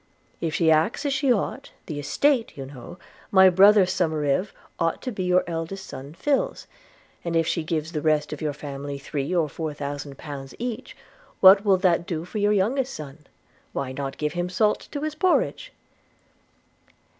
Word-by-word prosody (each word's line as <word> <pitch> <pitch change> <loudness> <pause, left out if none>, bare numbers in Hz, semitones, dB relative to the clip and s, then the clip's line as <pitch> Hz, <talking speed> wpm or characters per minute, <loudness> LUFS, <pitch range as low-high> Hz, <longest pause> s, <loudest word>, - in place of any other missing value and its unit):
If 160 -2 -1
she 165 -2 +3
acts 160 - +2
as 280 - +1
she 275 -2 +2
ought, 245 +5 -1 0.2
the 150 -3 -5
estate, 240 - +1
you 135 - -5
know, 135 +5 -10 0.5
brother 200 +2 +7
Somerive, 165 -1 0 0.3
ought 165 0 0
to 255 - -3
be 200 - -5
your 180 0 +3
eldest 170 +3 -5
son 140 +4 -9
Phil's; 295 - -1 0.6
and 170 -1 -2
if 165 0 +3
she 165 - 0
gives 160 0 -2
the 155 -3 -3
rest 150 -1 +1
of 150 - -8
your 155 -1 0
family 140 -1 -6
three 140 +1 -4
or 165 -3 +2
four 155 +1 -5
thousand 145 -1 -6
pounds 140 -3 -8
each, 245 +1 -5 0.4
what 195 +1 +8
will 195 -3 +4
that 175 -2 +2
do 165 -3 -3
for 210 +4 -5
your 205 +1 +3
youngest 245 +7 +1
son? 150 0 -10 0.5
Why, 135 -2 -3
not 135 0 -5
give 150 0 -2
him 175 0 -2
salt 210 +3 +1
to 285 - -4
his 310 0 -2
porridge.' 370 +9 +1
165 Hz, 175 wpm, -24 LUFS, 150-205 Hz, 0.6 s, what